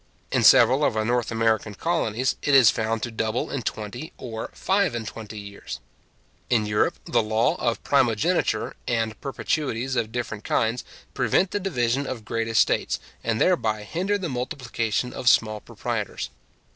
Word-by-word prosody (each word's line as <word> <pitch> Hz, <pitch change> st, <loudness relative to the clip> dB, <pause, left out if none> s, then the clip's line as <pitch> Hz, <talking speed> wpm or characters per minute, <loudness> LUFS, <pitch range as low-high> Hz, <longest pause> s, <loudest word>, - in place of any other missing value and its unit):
In -, -, +2 dB
several -, -, +7 dB
of -, -, +2 dB
our 110 Hz, -, +1 dB
North 120 Hz, 0 st, +1 dB
American 110 Hz, -2 st, +1 dB
colonies, 130 Hz, -, 0 dB
it 145 Hz, -, +3 dB
is 130 Hz, -5 st, +8 dB
found 110 Hz, 0 st, -2 dB
to 120 Hz, -, -3 dB
double 110 Hz, +1 st, -2 dB
in 140 Hz, -, -2 dB
twenty 110 Hz, +7 st, -5 dB
or 115 Hz, -3 st, -6 dB
five 190 Hz, -8 st, +1 dB
and 115 Hz, -1 st, -3 dB
twenty 110 Hz, 0 st, -8 dB
years. 100 Hz, -1 st, -8 dB, 0.7 s
In 115 Hz, -3 st, +3 dB
Europe, 105 Hz, 0 st, +1 dB
the -, -, +2 dB
law 110 Hz, +1 st, +2 dB
of 115 Hz, -1 st, -1 dB
primogeniture, 130 Hz, -1 st, +1 dB
and 115 Hz, -2 st, -1 dB
perpetuities 135 Hz, -2 st, -2 dB
of 110 Hz, -2 st, -1 dB
different 110 Hz, -3 st, -4 dB
kinds, 115 Hz, +2 st, 0 dB, 0.3 s
prevent 185 Hz, 0 st, +2 dB
the 205 Hz, -, -1 dB
division 135 Hz, -7 st, 0 dB
of 115 Hz, -5 st, -5 dB
great 115 Hz, 0 st, -2 dB
estates, 115 Hz, -1 st, +2 dB, 0.2 s
and 115 Hz, -1 st, 0 dB
thereby 110 Hz, -, +2 dB
hinder 185 Hz, -, -1 dB
the 185 Hz, -3 st, -3 dB
multiplication 125 Hz, -3 st, -2 dB
of 125 Hz, -, +2 dB
small 110 Hz, -2 st, +3 dB
proprietors. -, -, -4 dB
115 Hz, 160 wpm, -25 LUFS, 110-130 Hz, 0.7 s, is